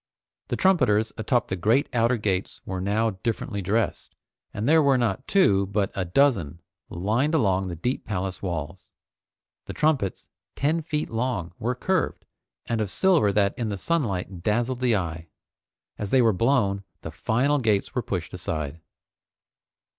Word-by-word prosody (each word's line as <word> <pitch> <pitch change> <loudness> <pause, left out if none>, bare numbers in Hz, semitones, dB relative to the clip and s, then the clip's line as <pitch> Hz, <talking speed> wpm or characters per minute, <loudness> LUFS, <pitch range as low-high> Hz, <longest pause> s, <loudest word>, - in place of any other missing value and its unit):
The - - -1
trumpeters 125 - +3
atop 120 +2 0
the 95 - -1
great 110 +10 +2
outer 120 +1 +2
gates 100 -3 -2
were 95 -1 -4
now 110 +4 +1
differently 110 -2 -2
dressed, 105 +3 -1 0.4
and 105 +4 -3
there 160 +2 +6
were 140 -3 +4
not 120 +1 -1
two 100 - +3
but 100 0 -1
a 95 - -2
dozen 90 - +2 0.3
lined 115 - 0
along 95 -8 +2
the 90 - -4
deep 125 +11 -2
palace 95 -2 -3
walls. 85 -1 -5 0.8
The - - -6
trumpets, 140 - 0 0.3
ten 155 +4 +1
feet 150 -1 -3
long, 115 -7 -2
were 125 +3 -1
curved, 185 +6 -1 0.4
and 115 -2 -1
of 105 - -1
silver 170 - +3
that 100 -1 +2
in 115 -3 -1
the 100 - -3
sunlight 95 - -2
dazzled 120 +5 0
the 125 -3 +2
eye. 85 -3 -3 0.7
As 105 - -3
they 130 +2 +4
were 110 -2 +4
blown, 100 -2 +1 0.2
the 80 - -6
final 125 - +1
gates 110 -5 +1
were - - 0
pushed - - -4
aside. 80 0 -4
110 Hz, 155 wpm, -25 LUFS, 95-130 Hz, 0.8 s, there